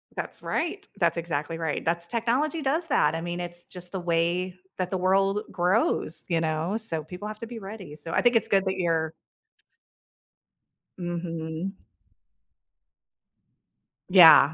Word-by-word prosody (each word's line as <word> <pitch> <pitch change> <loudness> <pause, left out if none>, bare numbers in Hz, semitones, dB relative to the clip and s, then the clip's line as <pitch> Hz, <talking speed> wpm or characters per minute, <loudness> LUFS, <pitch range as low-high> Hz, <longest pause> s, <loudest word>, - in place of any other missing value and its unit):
That's - - -5
right. 390 +5 -2
That's 170 -1 +2
exactly 165 -1 -3
right, 160 -2 -2
that's 170 +1 0
technology 250 - 0
does 315 +5 0
that, 255 - +2
I 165 - -3
mean, 175 0 -4
it's 175 0 -4
just 180 -1 -5
the 190 - -3
way 175 +1 0 0.2
that 185 -1 -2
the 190 - 0
world 195 +2 +2
grows, 180 -2 +1
you 165 -2 +1
know? 160 +4 -1
So, 200 -9 +4
people 180 +6 -8
have 215 0 -7
to 230 - -6
be 235 -1 -7
ready, 195 -6 -9
so, 165 +2 -1
I - - +2
think 245 -1 +3
it's 225 - +3
good 195 -1 +2
that 190 0 0
you're 165 -3 0 1.8
Mhm. 170 +1 -4 2.3
Yeah. 165 -5 +8
180 Hz, 150 wpm, -26 LUFS, 165-205 Hz, 2.3 s, Yeah